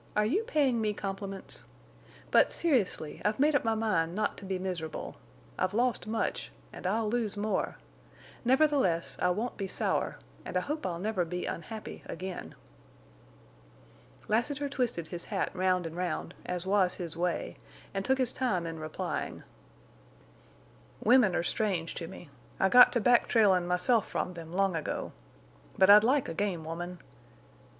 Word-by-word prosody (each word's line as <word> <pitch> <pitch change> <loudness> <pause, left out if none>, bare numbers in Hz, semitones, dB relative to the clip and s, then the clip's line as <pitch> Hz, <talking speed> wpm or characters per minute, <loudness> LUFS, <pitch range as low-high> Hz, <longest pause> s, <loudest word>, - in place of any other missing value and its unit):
Are 210 - +3
you 320 - +2
paying 275 - +2
me 210 -1 0
compliments? 195 -1 -5 0.7
But, - - +5
seriously 235 - 0
I've 210 +3 0
made 300 +2 +4
up 285 - +2
my 225 -1 +1
mind 185 -7 0
not 215 0 0
to 200 - -10
be 190 -1 -2
miserable. 180 -4 -5 0.4
I've 185 +2 0
lost 240 -1 +1
much, 220 - -2 0.2
and - - -5
I'll 220 +3 +1
lose 215 -2 -1
more. 210 +1 -1 0.7
Nevertheless, 260 - +2
I 180 - +3
won't 220 +7 -2
be 195 - -3
sour, - - -1 0.3
and - - -3
I - - +2
hope 300 +7 -3
I'll 170 -2 -3
never 195 0 0
be 180 +1 -4
unhappy—again." 190 -2 -6 1.7
Lassiter 270 +6 0
twisted 250 - -1
his 175 +1 -4
hat 200 -3 -1
round 185 -1 +1
and 165 0 -6
round, 180 -2 -3
as 180 0 -3
was 190 -2 +2
his 170 -3 -6
way, 175 +1 -2 0.4
and 195 0 -2
took 265 +3 +2
his 255 -2 +1
time 200 -10 -1
in 165 -1 -5
replying. 155 0 -4 1.6
"Women 230 -5 +5
are - - +1
strange 180 -3 -1
to 165 - -5
me. 175 -4 -11 0.3
I 190 - +4
got 245 +2 +9
to 240 - +2
back 240 +2 +4
trailin' 195 -6 +4
myself 180 +6 +2
from 180 - -2
them 165 -2 -9
long 190 0 +1
ago. 160 - -3 0.7
But 190 +1 +7
I'd 210 +1 +9
like 265 +3 +2
a 165 - -4
game 175 -3 -2
woman. 175 +2 -5
195 Hz, 160 wpm, -30 LUFS, 180-230 Hz, 1.7 s, got